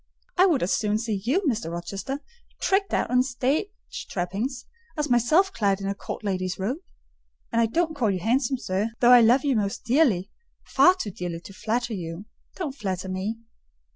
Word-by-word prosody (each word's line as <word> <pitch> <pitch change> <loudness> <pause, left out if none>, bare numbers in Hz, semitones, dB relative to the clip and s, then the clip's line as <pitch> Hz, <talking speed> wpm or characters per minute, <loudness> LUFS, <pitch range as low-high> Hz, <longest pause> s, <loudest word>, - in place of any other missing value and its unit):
I 370 +2 +6
would 315 - +2
as 180 - +1
soon 210 -1 +1
see 215 -3 -2
you, 275 - +2
Mr. 230 - -1
Rochester, 195 +11 -5 0.4
tricked 390 0 +1
out - - 0
in 250 0 +5
stage 265 - 0 0.4
trappings, 215 +8 -3 0.3
as 300 -3 -1
myself 310 - +4
clad 200 -3 +1
in 195 - -5
a 200 - 0
court 200 - -7
lady's 185 -2 -2
robe; 230 - -2 0.7
and 230 -1 +2
I 230 - +3
don't 320 +6 0
call 240 -7 +1
you 190 -2 0
handsome, 255 +6 +1
sir, 200 -1 -1
though 245 0 +6
I 245 -1 +9
love 245 +5 +4
you 275 -3 +2
most 200 -2 -1
dearly: 235 - +2 0.3
far 360 +1 +5
too 210 - -3
dearly 175 -2 -5
to 195 - -11
flatter 230 +4 -2
you. 170 0 -6 0.3
Don't 315 -8 -3
flatter 190 -7 -4
me." 200 +5 -3
230 Hz, 185 wpm, -25 LUFS, 195-270 Hz, 0.7 s, I